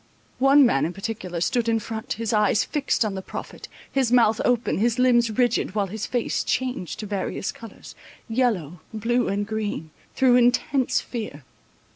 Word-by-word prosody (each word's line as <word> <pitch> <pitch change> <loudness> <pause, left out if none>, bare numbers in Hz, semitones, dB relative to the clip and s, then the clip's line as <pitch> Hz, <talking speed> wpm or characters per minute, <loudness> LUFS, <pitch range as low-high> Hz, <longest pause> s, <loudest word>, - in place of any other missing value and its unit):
One 270 +1 +6
man 135 - +2
in 175 - -6
particular 195 -4 -5
stood 235 +3 +1
in 225 - +2
front, 220 0 -4
his 230 0 -3
eyes 210 -1 +3
fixt 290 -6 0
on 210 - -2
the 190 - -4
prophet, - - -8 0.2
his 265 -3 +1
mouth 230 -3 +4
open, 245 -5 +1
his 235 +2 +1
limbs 240 -2 +4
rigid, 235 -2 0
while 205 -2 +1
his 210 +3 -5
face 245 -2 -1
changed 255 -9 -2
to - - -5
various 195 -1 -3
colours, 230 -2 -12 0.3
yellow, 220 - 0 0.2
blue, 240 +3 0
and 205 +1 -1
green, 205 -7 -4 0.2
through 255 -2 +5
intense 245 +2 +2
fear. 215 - -6
225 Hz, 165 wpm, -24 LUFS, 205-245 Hz, 0.3 s, One